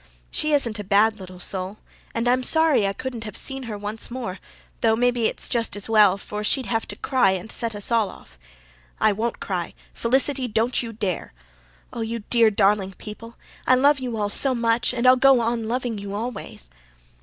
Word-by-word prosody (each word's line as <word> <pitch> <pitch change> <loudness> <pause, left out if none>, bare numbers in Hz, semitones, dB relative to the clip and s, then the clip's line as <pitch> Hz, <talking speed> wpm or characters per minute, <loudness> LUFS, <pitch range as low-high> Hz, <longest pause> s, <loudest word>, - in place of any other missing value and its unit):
"She 305 - 0
isn't 235 -7 +1
a - - -4
bad 210 +2 +3
little 185 -1 -10
soul, 185 +2 -4 0.4
and 230 +1 0
I'm 250 +1 +3
sorry 310 -6 +4
I 195 - -1
couldn't 230 -4 -6
see 270 -1 -1
her 225 -5 -6
once 210 +2 -5
more, 235 -6 -5 0.4
though 220 -1 +3
maybe 245 -1 +2
it's - - -4
just 230 -3 -1
as 205 - -2
well 210 -4 +5
for 210 +1 -6
she'd 260 +4 +1
have 225 -1 -1
to - - -6
cry 250 -8 +2
and 190 +3 -5
set 230 -2 -1
us 205 +3 -2
all 225 -4 +2
off. - - -15 0.6
I - - +4
WON'T 220 +3 -2
cry. 180 -3 -4 0.2
Felicity, 265 +2 +1
don't 230 +2 0
you 230 -2 -6
dare. 205 - -3 0.6
Oh, 235 - -4
you 225 -1 -4
dear, 230 -2 +5
darling 200 -1 +2
people, 225 +4 -10 0.3
I 255 - +6
love 280 +2 +4
you 245 -3 -4
all 205 -1 -1
so 260 +5 +2
much 235 0 +1
and 245 0 -2
I'll 255 0 +7
go 270 -1 +5
on 230 -1 -1
loving 240 -2 -2
you 200 0 -6
always." 215 - -6
225 Hz, 195 wpm, -23 LUFS, 205-245 Hz, 0.6 s, I'll